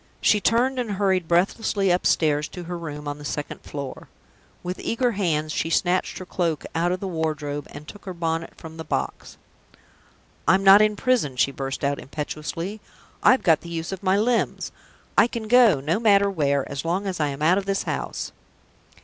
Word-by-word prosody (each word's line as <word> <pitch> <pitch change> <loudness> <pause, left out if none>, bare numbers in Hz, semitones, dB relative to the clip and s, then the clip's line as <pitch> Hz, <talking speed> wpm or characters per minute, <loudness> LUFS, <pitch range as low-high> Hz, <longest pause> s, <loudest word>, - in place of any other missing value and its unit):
She 210 - +3
turned 250 +5 +2
and 230 -4 -2
hurried 190 -3 +1
breathlessly 195 +2 +2
upstairs 155 -4 +2
to 180 - -8
her 175 +1 -5
room 150 -3 -6
on 145 0 -4
the - - -10
second 145 0 -5
floor. 140 -2 -7 0.5
With 180 +1 -4
eager 245 +1 0
hands 160 -7 0
she 160 - -1
snatched 180 +2 +1
her 185 - -7
cloak 170 -4 -2
out 170 +2 +1
of 185 - -1
the 195 - -4
wardrobe, 155 -4 -3
and 150 - -10
took 205 - -12
her 185 - -5
bonnet 165 -1 -2
from 160 0 -10
the 160 - -5
box. 65 - -4 1.1
"I'm 195 +1 +4
not 195 +1 +9
in 215 0 +3
prison!" 220 - +1
she 130 +2 +2
burst 135 0 -5
out, 140 0 0
impetuously. 160 +7 -5 0.4
"I've 260 - +5
got 160 -4 +4
the 170 - -10
use 165 +1 -4
of 190 - -5
my 190 0 +2
limbs! 230 +3 0 0.5
I - - +6
can 230 -2 -5
go 235 - +6
no 155 +9 0
matter 200 -3 +4
where, 140 -6 0
as 140 0 -5
long 180 +5 -1
as 190 -3 -3
I 150 - +2
am 140 +1 -4
out 180 +5 +4
of 195 - -6
this 195 0 0
house!" - - -4
175 Hz, 190 wpm, -24 LUFS, 150-200 Hz, 1.1 s, not